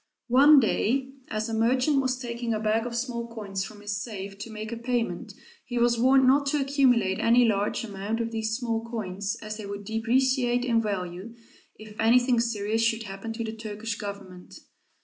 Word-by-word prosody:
One 280 Hz, +4 st, +7 dB
day 265 Hz, +3 st, 0 dB, 0.2 s
as 215 Hz, +1 st, -3 dB
a 225 Hz, -, -4 dB
merchant 255 Hz, +5 st, +2 dB
was 255 Hz, -1 st, -1 dB
taking 235 Hz, -2 st, -3 dB
a -, -, -2 dB
bag 220 Hz, +2 st, 0 dB
of 235 Hz, -, -6 dB
small 235 Hz, -1 st, -3 dB
coins 205 Hz, -4 st, -4 dB
from 205 Hz, +1 st, -10 dB
his 205 Hz, 0 st, -3 dB
safe 200 Hz, -3 st, -6 dB
to 230 Hz, -, -7 dB
make 215 Hz, 0 st, -6 dB
a 235 Hz, -, -4 dB
payment, 235 Hz, 0 st, -2 dB, 0.3 s
he 245 Hz, -, -5 dB
was 235 Hz, 0 st, +3 dB
warned 260 Hz, +2 st, +5 dB
not 280 Hz, +2 st, +4 dB
to 295 Hz, +1 st, +1 dB
accumulate 255 Hz, -8 st, +2 dB
any 240 Hz, +1 st, +5 dB
large 205 Hz, +2 st, 0 dB
amount 210 Hz, +1 st, -4 dB
of 230 Hz, 0 st, -2 dB
these 220 Hz, 0 st, -2 dB
small 230 Hz, -3 st, -2 dB
coins, 205 Hz, -2 st, -4 dB
as 215 Hz, 0 st, -5 dB
they 210 Hz, -2 st, -7 dB
would 200 Hz, 0 st, -6 dB
depreciate 245 Hz, +3 st, +1 dB
in 230 Hz, -2 st, +2 dB
value, 195 Hz, +1 st, -4 dB, 0.4 s
if 215 Hz, -1 st, -13 dB
anything 245 Hz, +2 st, +4 dB
serious 225 Hz, -1 st, 0 dB
should 230 Hz, 0 st, +1 dB
happen 195 Hz, +2 st, -6 dB
to 230 Hz, +1 st, -4 dB
the 220 Hz, -1 st, -4 dB
Turkish 220 Hz, 0 st, -5 dB
Government. 200 Hz, -3 st, -8 dB
225 Hz, 190 wpm, -26 LUFS, 210-245 Hz, 0.4 s, One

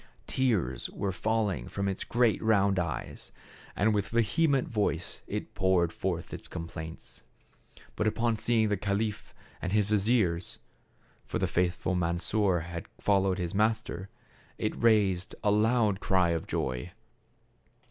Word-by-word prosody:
Tears 100 Hz, -, 0 dB
were 100 Hz, -, -2 dB
falling 105 Hz, -, -1 dB
from 100 Hz, 0 st, -2 dB
its 95 Hz, -1 st, -2 dB
great 120 Hz, -2 st, +2 dB
round 100 Hz, -3 st, +3 dB
eyes, 85 Hz, -4 st, -4 dB, 0.4 s
and 105 Hz, +2 st, +3 dB
with 100 Hz, -2 st, 0 dB
ve 115 Hz, +3 st, +2 dB
hement 140 Hz, +4 st, +2 dB
voice 100 Hz, -6 st, -2 dB
it -, -, -4 dB
poured 90 Hz, -3 st, +2 dB
forth 90 Hz, -3 st, -3 dB
its -, -, -8 dB
complaints. 80 Hz, -1 st, -8 dB, 0.7 s
But 105 Hz, -, 0 dB
upon 115 Hz, +1 st, +1 dB
seeing 110 Hz, -1 st, +2 dB
the 105 Hz, -, +1 dB
caliph 105 Hz, +2 st, -2 dB, 0.3 s
and 95 Hz, -, -2 dB
his 105 Hz, -1 st, +2 dB
vizier 105 Hz, -4 st, +3 dB, 0.5 s
— -, -, -36 dB
for -, -, -2 dB
the -, -, +1 dB
faithful 90 Hz, +1 st, 0 dB
Mansor 90 Hz, +2 st, +1 dB
had 85 Hz, 0 st, -6 dB
followed 95 Hz, -2 st, +2 dB
his 90 Hz, -3 st, -3 dB
master 105 Hz, -3 st, 0 dB, 0.2 s
— -, -, -28 dB
it -, -, -1 dB
raised 100 Hz, -6 st, +2 dB
a 105 Hz, -, +3 dB
loud 105 Hz, -1 st, +3 dB
cry 95 Hz, -3 st, +2 dB
of 85 Hz, -1 st, -2 dB
joy. 65 Hz, +7 st, -2 dB
100 Hz, 145 wpm, -29 LUFS, 90-110 Hz, 0.7 s, round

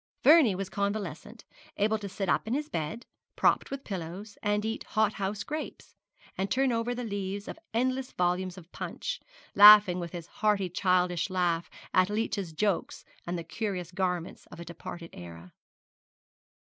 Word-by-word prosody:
Vernie 290 Hz, -, +7 dB
was 195 Hz, 0 st, -3 dB
convalescent, 200 Hz, +1 st, -4 dB, 0.3 s
able 215 Hz, +2 st, +2 dB
to 200 Hz, -1 st, -6 dB
sit 195 Hz, +1 st, -3 dB
up -, -, +1 dB
in 235 Hz, -, 0 dB
his 300 Hz, +1 st, -3 dB
bed, 160 Hz, +9 st, -4 dB, 0.3 s
propped -, -, +2 dB
with 275 Hz, 0 st, -5 dB
pillows, 190 Hz, +2 st, -6 dB
and 205 Hz, +1 st, 0 dB
eat 225 Hz, +1 st, -3 dB
hot 215 Hz, -1 st, +1 dB
house 200 Hz, +1 st, -3 dB
grapes, 305 Hz, +6 st, -6 dB, 0.4 s
and 195 Hz, +1 st, -2 dB
turn 265 Hz, +4 st, +2 dB
over 235 Hz, +1 st, -1 dB
the 245 Hz, -, -4 dB
leaves 200 Hz, -2 st, -4 dB
of -, -, -7 dB
endless 255 Hz, +3 st, 0 dB
volumes 180 Hz, +1 st, -1 dB
of 175 Hz, -1 st, -13 dB
Punch, -, -, -4 dB, 0.3 s
laughing 205 Hz, -3 st, +9 dB
with 170 Hz, -1 st, -5 dB
his 170 Hz, -3 st, -6 dB
hearty 210 Hz, -3 st, 0 dB
childish 180 Hz, 0 st, +1 dB
laugh 175 Hz, -3 st, 0 dB, 0.2 s
at 185 Hz, +1 st, +4 dB
Leech's 210 Hz, -4 st, -2 dB
jokes 190 Hz, +4 st, -1 dB, 0.2 s
and 175 Hz, +1 st, -2 dB
the 170 Hz, -, -5 dB
curious 185 Hz, -4 st, -4 dB
garments 180 Hz, -2 st, -3 dB
of -, -, -12 dB
a 170 Hz, -, -7 dB
departed 170 Hz, 0 st, -8 dB
era. 85 Hz, 0 st, -11 dB
195 Hz, 160 wpm, -29 LUFS, 180-220 Hz, 0.4 s, laughing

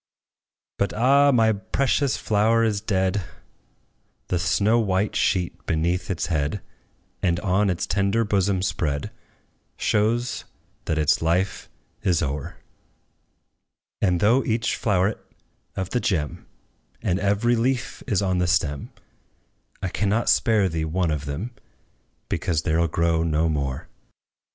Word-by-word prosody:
But, 100 Hz, -, 0 dB
ah! 140 Hz, +5 st, +5 dB
my 115 Hz, -3 st, +4 dB
precious 135 Hz, +6 st, 0 dB
flower 110 Hz, +2 st, +2 dB
is 105 Hz, -3 st, 0 dB
dead: 95 Hz, -1 st, 0 dB, 1.1 s
The 90 Hz, -, +1 dB
snow 105 Hz, +6 st, +2 dB
white 100 Hz, -1 st, 0 dB
sheet 90 Hz, -2 st, 0 dB
beneath 85 Hz, +3 st, 0 dB
its 90 Hz, -3 st, -1 dB
head, 75 Hz, +3 st, -1 dB, 0.6 s
And 85 Hz, -2 st, +1 dB
on 100 Hz, 0 st, +2 dB
its 90 Hz, -2 st, -1 dB
tender 100 Hz, +4 st, +1 dB
bosom 100 Hz, -3 st, +1 dB
spread, 75 Hz, -7 st, -2 dB, 0.7 s
Shows 115 Hz, +3 st, 0 dB, 0.4 s
that 80 Hz, -, -1 dB
its 75 Hz, -2 st, +2 dB
life 85 Hz, +4 st, 0 dB, 0.3 s
is 90 Hz, -6 st, +1 dB
o'er: 70 Hz, -1 st, -4 dB, 1.5 s
And 90 Hz, -4 st, +2 dB
though 120 Hz, +6 st, +4 dB
each 115 Hz, +1 st, 0 dB
floweret 105 Hz, -1 st, +1 dB, 0.6 s
of 95 Hz, -1 st, -4 dB
the 125 Hz, -, +1 dB
gem, 85 Hz, -, -2 dB, 0.6 s
And 90 Hz, +1 st, +1 dB
every 105 Hz, +5 st, +2 dB
leaf, 125 Hz, +2 st, -1 dB
is 105 Hz, -5 st, +1 dB
on 95 Hz, -2 st, +1 dB
the 90 Hz, -, +1 dB
stem, 80 Hz, -4 st, 0 dB, 0.9 s
I 95 Hz, -, 0 dB
cannot 105 Hz, +5 st, +1 dB
spare 110 Hz, -6 st, +3 dB
thee 80 Hz, -2 st, -2 dB
one 85 Hz, +1 st, 0 dB
of 75 Hz, -1 st, -3 dB
them, 80 Hz, +12 st, -4 dB, 0.8 s
Because 80 Hz, -4 st, -1 dB
there 80 Hz, +2 st, +1 dB
'll 85 Hz, -, +2 dB
grow 85 Hz, +1 st, +1 dB
no 80 Hz, 0 st, +1 dB
more. 70 Hz, -4 st, -2 dB
95 Hz, 130 wpm, -24 LUFS, 85-110 Hz, 1.5 s, ah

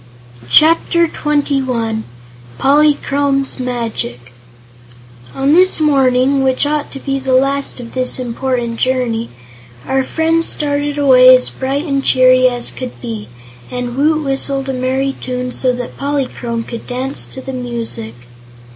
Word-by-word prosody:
Chapter 330 Hz, -, +4 dB
Twenty 290 Hz, -3 st, 0 dB
One 225 Hz, -4 st, -2 dB, 0.5 s
Polychrome's 280 Hz, -1 st, +2 dB
Magic 225 Hz, -, -4 dB, 1.0 s
On 275 Hz, +2 st, +2 dB
this 365 Hz, +1 st, +4 dB
morning, 270 Hz, -2 st, +3 dB
which 260 Hz, +1 st, +1 dB
ought 295 Hz, 0 st, -2 dB
to 275 Hz, -, -7 dB
be 275 Hz, 0 st, -2 dB
the 265 Hz, -1 st, 0 dB
last 275 Hz, +1 st, +1 dB
of 235 Hz, -2 st, -9 dB
this 255 Hz, -1 st, -1 dB
important 245 Hz, -1 st, -2 dB
journey, 245 Hz, -3 st, -1 dB, 0.6 s
our 265 Hz, 0 st, +1 dB
friends 325 Hz, +3 st, +1 dB
started 290 Hz, 0 st, -2 dB
away 255 Hz, -2 st, +7 dB
as 255 Hz, -, 0 dB
bright 275 Hz, +4 st, -3 dB
and 275 Hz, -3 st, -1 dB
cheery 255 Hz, 0 st, +5 dB
as 245 Hz, -1 st, -3 dB
could 255 Hz, -, -8 dB
be, 110 Hz, -2 st, -6 dB, 0.4 s
and 245 Hz, -1 st, -4 dB
Woot 305 Hz, +3 st, +2 dB
whistled 275 Hz, 0 st, -1 dB
a -, -, -1 dB
merry 260 Hz, +2 st, -1 dB
tune 250 Hz, 0 st, -3 dB
so 255 Hz, 0 st, 0 dB
that 245 Hz, 0 st, -6 dB
Polychrome 260 Hz, -5 st, -3 dB
could 235 Hz, 0 st, -8 dB
dance 260 Hz, +2 st, -3 dB
to -, -, -8 dB
the 265 Hz, 0 st, -7 dB
music. 235 Hz, -, -5 dB
260 Hz, 140 wpm, -15 LUFS, 245-280 Hz, 1.0 s, away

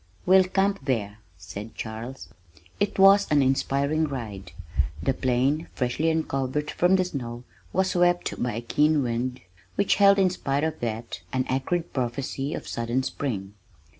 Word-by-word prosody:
"We'll 185 Hz, +1 st, +6 dB
camp 195 Hz, +2 st, 0 dB
there," 110 Hz, -5 st, -1 dB, 0.2 s
said 100 Hz, +6 st, -8 dB
Charles. 115 Hz, +4 st, -7 dB, 0.5 s
It 205 Hz, 0 st, 0 dB
was 195 Hz, +1 st, +7 dB
an 145 Hz, -2 st, +4 dB
inspiring 140 Hz, +3 st, +1 dB
ride! 105 Hz, -9 st, -6 dB, 0.5 s
The 135 Hz, -, +2 dB
plain 130 Hz, +5 st, +1 dB
freshly 130 Hz, +6 st, 0 dB
uncovered 150 Hz, -2 st, -1 dB
from 180 Hz, +2 st, +3 dB
the 185 Hz, -1 st, +2 dB
snow 120 Hz, -7 st, -5 dB, 0.3 s
was 190 Hz, 0 st, +1 dB
swept 175 Hz, 0 st, +1 dB
by 120 Hz, -2 st, 0 dB
a 115 Hz, -, -3 dB
keen 150 Hz, +4 st, +2 dB
wind 125 Hz, +1 st, -2 dB, 0.3 s
which 200 Hz, -, +2 dB
held 200 Hz, 0 st, +6 dB
in 190 Hz, -2 st, +4 dB
spite 140 Hz, -5 st, -1 dB
of 160 Hz, 0 st, -2 dB
that 115 Hz, 0 st, -4 dB
an 130 Hz, -1 st, 0 dB
acrid 160 Hz, +6 st, -1 dB
prophecy 135 Hz, +3 st, -2 dB
of -, -, -7 dB
sudden 120 Hz, +3 st, -1 dB
spring. 105 Hz, -9 st, -4 dB
135 Hz, 150 wpm, -26 LUFS, 120-175 Hz, 0.5 s, was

